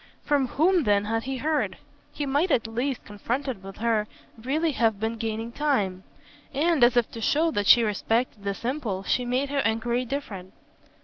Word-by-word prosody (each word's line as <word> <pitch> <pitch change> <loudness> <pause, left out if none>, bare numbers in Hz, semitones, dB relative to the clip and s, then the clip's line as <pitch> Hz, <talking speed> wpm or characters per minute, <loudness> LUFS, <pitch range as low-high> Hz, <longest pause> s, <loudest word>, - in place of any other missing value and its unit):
From 285 -3 +2
whom 340 +8 +3
then 205 0 +3
had 225 +2 -1
he 265 0 -3
heard? 305 +3 -1 0.3
He 290 - -3
might 285 +7 +1
at 240 -7 +2
last, 245 +4 -3
confronted 235 +3 -3
with 195 0 -10
her, 220 -2 +1 0.3
really 290 +8 0
have 225 -6 +1
been 220 +1 -1
gaining 225 +1 -3
time; 210 -10 0 0.5
and 310 -1 +3
as 240 0 +5
if 240 - +2
to 230 - -7
show 320 +8 +2
that 205 -7 -1
she 240 - +8
respected 220 +1 -1
this 200 +3 -4
impulse 230 -8 -2
she 250 - +1
made 255 +3 0
her 285 0 0
enquiry 235 +1 0
different. 210 -9 -6
240 Hz, 180 wpm, -26 LUFS, 220-280 Hz, 0.5 s, she